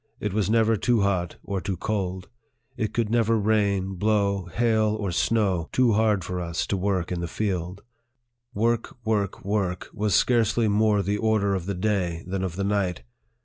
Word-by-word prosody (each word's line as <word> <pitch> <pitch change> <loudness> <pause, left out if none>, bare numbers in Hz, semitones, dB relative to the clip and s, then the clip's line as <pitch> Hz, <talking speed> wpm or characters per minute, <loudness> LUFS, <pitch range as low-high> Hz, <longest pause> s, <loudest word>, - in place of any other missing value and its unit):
It 105 -2 -3
was 105 -2 0
never 115 0 +3
too 120 0 +2
hot 95 -3 0
or 100 -2 -3
too 95 -1 -3
cold; 95 -2 -3 0.5
it 110 -2 -2
could 115 -2 -1
never 115 -1 +3
rain, 100 -3 +1
blow, 100 -2 +1
hail, 110 +2 +1
or 100 -3 -2
snow, 95 -3 +1
too 125 -3 +3
hard 105 -3 +2
for 90 +1 -4
us 85 -1 -2
to - - -1
work 95 -2 -1
in 90 - -2
the 85 - -3
field. 95 0 -3 0.7
Work, 115 +3 -1
work, 100 -4 -1
work, 100 -3 -1
was 105 -1 0
scarcely 115 -2 +3
more 105 -1 +2
the 100 +2 -1
order 110 -3 +2
of 95 -2 -3
the 100 - -2
day 90 -4 -1
than 95 +1 -3
of 90 -3 -3
the 100 - -2
night. 100 -3 -1
100 Hz, 180 wpm, -25 LUFS, 95-110 Hz, 0.7 s, never